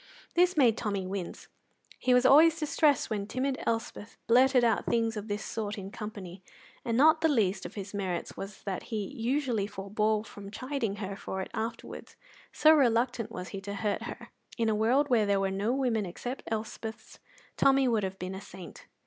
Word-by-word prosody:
This 360 0 +3
made 240 -6 +5
Tommy 200 -3 -2
wince. 185 -2 -6 0.5
He 255 - +1
was 250 0 +5
always 320 +4 +7
distressed 300 -4 +2
when 205 -2 -2
timid 260 +3 -2
Elspeth 225 -1 -3
blurted 255 +1 +5
out 230 -1 +2
things 230 -1 +1
of 210 0 -5
this 205 0 -3
sort 215 -2 -4
in 195 0 -7
company, 200 -4 -8 0.4
and 230 -1 -1
not 315 +4 +5
the 325 - +4
least 205 -8 +1
of - - -15
his 200 0 -7
merits 185 -4 -3
was 195 0 -8
that 195 -2 -4
he 215 -3 -2
usually 240 -3 0
forbore 210 +2 -1
from 200 -2 -10
chiding 240 -1 -3
her 195 -1 -5
for 190 - -5
it - - -11
afterwards, 225 0 -6 0.4
so 310 0 +6
reluctant 245 -4 +2
was 180 0 -6
he 195 - -6
to 200 +1 -6
hurt 205 0 -1
her. - - -8 0.3
In 230 -2 +1
a 215 - +1
world 255 +7 +2
where 220 -4 +4
there 200 -1 +2
were 195 0 0
no 200 +4 0
women 245 -6 0
except 245 +9 -6
Elspeths, 220 0 -5 0.4
Tommy 270 -1 +4
would 225 -3 +2
have 190 -1 -4
been 185 +1 -5
a 190 - -7
saint. 190 -3 -11
220 Hz, 190 wpm, -29 LUFS, 200-255 Hz, 0.5 s, always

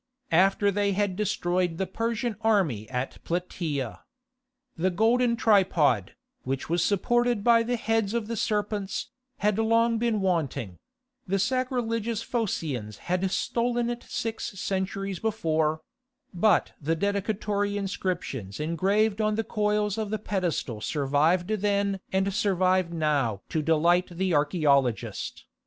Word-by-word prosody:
after 195 +4 +4
they 200 0 +1
had 200 -1 0
destroyed 180 -4 0
the 190 - 0
Persian 230 +4 -2
army 165 - +1
at 125 +1 -4
Platæa. 150 - -3 0.8
The 180 +3 +1
golden 235 +5 +2
tripod, 185 - +3 0.3
which 135 +1 -3
was 170 +1 +1
supported 240 +2 +1
by 235 0 +5
the 240 +2 0
heads 225 -1 0
of 235 -2 0
the 230 +2 -4
serpents, 210 -2 -2 0.3
had 210 0 +2
long 230 +1 +3
been 230 -2 +1
wanting: 140 - -1 0.5
the 195 +2 +1
sacrilegious 230 -1 -1
Phocians 145 - -2
had 185 +1 +1
stolen 235 +4 0
it 240 0 -5
six 225 -3 -4
centuries 195 0 -2
before; 160 -8 0 0.5
but 185 +1 +3
the 160 +3 0
dedicatory 205 +2 -1
inscriptions 180 - -3
engraved 195 +7 +1
on 215 0 +1
the 225 - 0
coils 210 -1 0
of 215 -2 -2
the 215 - -1
pedestal 175 - -2
survived 150 +7 +1
then 200 -2 0
and 190 +1 +1
survive 185 -4 +2
now 145 - 0
to 155 - 0
delight 170 +3 +3
the 185 +1 -1
archæologist. 140 - +1
195 Hz, 125 wpm, -27 LUFS, 165-215 Hz, 0.8 s, by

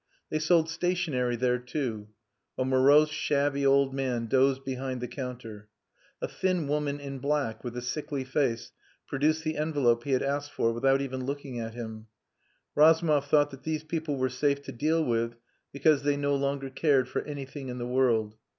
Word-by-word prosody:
They 155 - 0
sold 160 +1 +3
stationery 160 -7 0
there, 125 +1 +1
too. 125 -5 -4 0.5
A 130 - 0
morose, 140 +4 +5
shabby 140 -1 0
old 135 0 +4
man 130 -4 -1
dozed 135 +2 +2
behind 130 -1 -3
the 125 - -4
counter. 115 -5 -7 0.5
A - - 0
thin 185 -5 -1
woman 145 0 -1
in 140 -1 -6
black, 140 -4 -1
with 120 -1 -5
a 125 - -4
sickly 140 +1 -3
face, 130 -3 -1 0.3
produced 155 +3 0
the 155 -1 -2
envelope 140 -7 +1
he 140 - -1
had 130 - +2
asked 145 +1 -2
for 115 0 +1
without 135 +3 +2
even 130 -1 -4
looking 140 -2 -4
at 115 0 -5
him. 110 -2 -7 0.7
Razumov 155 -2 +4
thought 145 0 +3
that 135 -1 -11
these 155 +1 -3
people 155 -2 -3
were 130 0 +1
safe 140 +2 0
to - - -7
deal 155 +6 +1
with 115 -1 0 0.4
because 145 +1 +3
they 145 0 +1
no 145 0 +1
longer 140 -1 -2
cared 135 -2 +2
for - - -2
anything 140 -1 -7
in 125 0 -5
the 120 - -4
world. 120 -4 +2
135 Hz, 180 wpm, -28 LUFS, 125-145 Hz, 0.7 s, morose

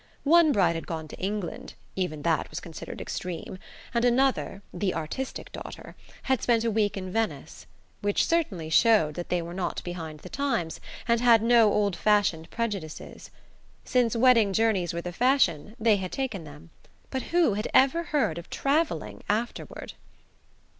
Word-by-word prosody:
One 325 +1 +6
bride 185 -8 +3
had 165 - -6
gone 160 -2 -4
to - - -10
England 200 -1 -4 0.2
(even 155 -6 -3
that 165 -2 +1
was - - -5
considered 165 -3 -8
extreme), 180 +1 -5 0.3
and 235 -1 +1
another 245 -5 +1
the 185 +1 -1
artistic 165 +12 -5
daughter - - -9 0.3
had 265 -2 +1
spent 230 -2 +2
a 230 - +1
week 210 -2 +1
in 185 -1 -5
Venice; 225 +2 -3 0.3
which 205 -1 +1
certainly 195 - -1
showed 205 -5 +4
that 175 +2 -6
they 175 -1 0
were 170 +1 -7
not 185 0 -3
behind 165 -4 -6
the - - -10
times, 180 -10 -2 0.3
and 235 0 +2
had 230 -3 +6
no 230 -2 +5
old 200 -3 +1
fashioned 185 -4 +1
prejudices. 200 -9 -5 0.6
Since 245 -3 +2
wedding 230 -4 +5
journeys 200 -5 +2
were 170 - -4
the 175 0 -6
fashion, 215 - +2
they 220 -2 +4
had 185 -2 -5
taken 225 -11 -3
them; 150 +3 -13 0.4
but 265 - -2
who 340 -10 +3
had 210 +2 -2
ever 275 +6 +4
heard 225 - 0
of 170 - -12
travelling 305 +4 -1
afterward? 220 +3 -3
205 Hz, 160 wpm, -27 LUFS, 175-240 Hz, 0.6 s, One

